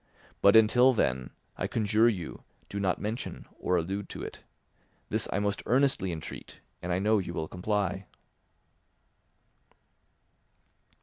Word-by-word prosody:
But 100 +1 +6
until 125 +4 +6
then, 65 - 0 0.3
I - - -1
conjure 110 +1 +3
you, 90 -7 -5 0.3
do 100 - -4
not 95 -2 0
mention 110 +3 -4
or 90 - +1
allude 95 +4 -3
to - - -6
it. - - -7 0.7
This - - 0
I - - 0
most 100 0 0
earnestly 130 -7 +2
entreat, 80 -2 -8 0.2
and 90 - -3
I 90 - +2
know 105 +3 +3
you 85 -3 -5
will 80 - -2
comply." 100 +1 -2
100 Hz, 130 wpm, -29 LUFS, 90-110 Hz, 0.7 s, But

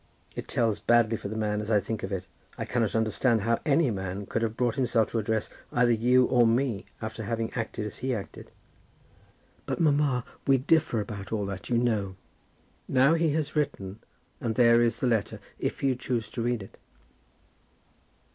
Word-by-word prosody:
It - - -5
tells 110 -3 +1
badly 115 +1 +3
for 105 - -6
the 110 +2 -5
man, 105 -1 0
as 105 - -6
I 105 -2 +4
think 110 +1 -4
of 95 - -5
it. 95 -1 -3 0.3
I - - -3
cannot 115 -4 0
understand 110 +1 +2
how 115 +3 +1
any 150 -2 +3
man 95 0 -4
could 115 - -2
have 115 -1 -2
brought 120 -2 +1
himself 120 -5 +1
to 115 - 0
address 110 0 -1 0.2
either 120 0 +3
you 125 +3 +4
or 120 -2 +4
me, 115 -3 0 0.2
after 110 +1 -5
having 115 +1 -3
acted 110 -2 -3
as 105 - -7
he 130 +1 -1
acted." 100 - -8 1.2
"But, - - -2
mamma, 145 -6 +2 0.2
we 135 -1 +5
differ 145 -3 +2
about 100 -3 -7
all 105 -2 -1
that, 95 -2 -6
you 120 - +2
know." 110 -6 0 0.7
"Now 135 +3 +4
he 165 -2 +2
has 155 -1 -2
written, 105 -9 -2 0.4
and 115 -2 -2
there 120 -1 +6
is 120 0 +1
the - - +1
letter, 115 -4 0 0.2
if - - -3
you 135 -2 +3
choose 120 -3 -3
to 120 - -4
read 120 -3 -1
it." 95 - -15
115 Hz, 185 wpm, -28 LUFS, 105-125 Hz, 1.2 s, there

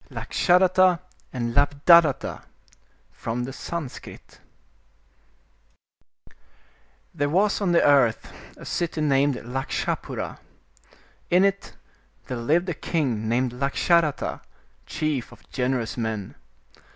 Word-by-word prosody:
Lakshadatta 185 0 +3 0.3
and 120 -2 -3
Labdhadatta 145 +2 +4 0.7
From 120 +2 -4
the 130 +2 -6
Sanskrit 160 -3 -8 2.8
'T*HERE 145 0 0
was 200 +6 +1
on 190 -3 +1
the 170 - +4
earth 135 -6 +3 0.2
a - - -11
city 170 -2 -2
named 140 -2 +2
Lakshapura. 135 +2 -4 0.9
In 180 +2 +4
it 200 0 -2 0.5
there 125 - -5
lived 160 +10 +1
a - - -1
king 130 -9 -2
named 125 +1 +1
Lakshadatta, 145 +4 0 0.5
chief 150 -6 -2
of 120 - -17
gen 130 0 0
erous 115 -3 -3
men. 110 -4 -3
145 Hz, 100 wpm, -24 LUFS, 125-170 Hz, 2.8 s, Labdhadatta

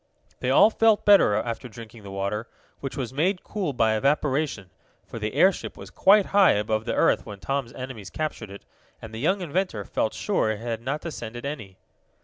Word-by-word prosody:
They 125 - -2
all 200 +11 +6
felt 225 -1 +3
better 200 - +6
after 115 +3 -3
drinking 115 +1 -12
the 100 - -10
water, 100 +3 -3 0.3
which 135 - -6
was 130 -2 -4
made 180 +7 0
cool 195 -8 -3
by 115 -4 +2
evaporation, 135 - 0 0.3
for - - -8
the 105 0 -4
airship 190 0 +2
was - - -10
quite 200 +1 +5
high 200 -2 +6
above 110 +1 -1
the - - -2
earth - - +3
when 105 -2 -8
Tom's 135 +3 -3
enemies 125 -7 -7
captured 150 -7 -4
it, 100 +1 -11 0.3
and 110 - -10
the 110 - -6
young 185 - +1
inventor 175 - -2
felt 110 - -1
sure 105 +1 0
it 110 - -1
had 115 -1 -4
not 140 +5 -3
descended 120 -6 -7
any. 110 -10 -6
120 Hz, 190 wpm, -25 LUFS, 110-155 Hz, 0.3 s, all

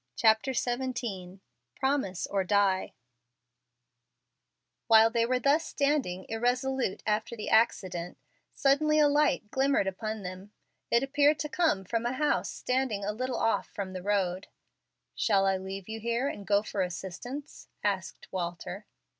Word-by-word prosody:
CHAPTER 220 - +3
XVII 240 -8 -3 0.3
"PROMISE 265 -10 0
OR 195 -1 +1
DIE" 195 -1 +2 1.9
While 225 0 +7
they 230 0 +2
were 255 +1 +2
thus 285 +5 +3
standing 280 - -1
irresolute 245 0 -1
after 215 +2 -1
the 215 - -5
accident, 185 -6 +1 0.4
suddenly 305 +3 +3
a 300 -1 +6
light 290 -7 +2
glimmered 270 -5 +2
upon 215 +2 -4
them. 185 +3 -8 0.4
It 235 +2 +3
appeared 290 +2 +3
to 300 - -3
come 310 - +1
from 230 +4 -1
a 245 - -1
house 295 +3 +1
standing 250 -6 -1
a 210 - -1
little 255 +3 -3
off 225 - +1
from 190 -2 -6
the 185 - -5
road. 190 -2 0 0.7
"Shall 195 -3 +2
I 195 -1 +2
leave 190 0 -7
you 220 0 -5
here 235 +4 0
and 205 -8 -6
go 205 0 +3
for 205 -2 -3
assistance?" 195 - -6 0.2
asked 195 -3 -2
Walter. 175 +2 -5
220 Hz, 140 wpm, -29 LUFS, 195-260 Hz, 1.9 s, While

